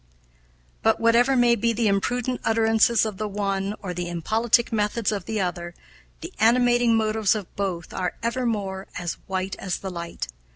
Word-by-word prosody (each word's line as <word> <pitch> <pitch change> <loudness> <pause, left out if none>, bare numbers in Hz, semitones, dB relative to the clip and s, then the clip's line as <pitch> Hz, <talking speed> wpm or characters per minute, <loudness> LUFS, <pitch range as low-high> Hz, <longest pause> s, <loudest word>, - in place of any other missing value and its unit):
"But, 225 - +2
whatever 235 +3 +4
may 240 -1 +4
be 230 +1 0
the 225 0 +1
imprudent 245 +5 0
utterances 225 0 +3
of 215 -3 -4
the 215 - -2
one 200 0 -2
or 180 -2 -4
the 175 0 -4
impolitic 225 +8 +1
methods 210 +1 0
of 200 -4 -3
the 220 -1 -2
other, 175 -2 -3 0.5
the - - -8
animating 240 +1 +4
motives 220 -1 +2
of 205 -4 -7
both 185 -4 -3
are 180 -2 -2
evermore 220 -6 -2
as 175 -1 -4
white 190 0 -2
as 185 -2 -2
the 190 - -6
light. 170 - -5
215 Hz, 165 wpm, -24 LUFS, 190-230 Hz, 0.5 s, whatever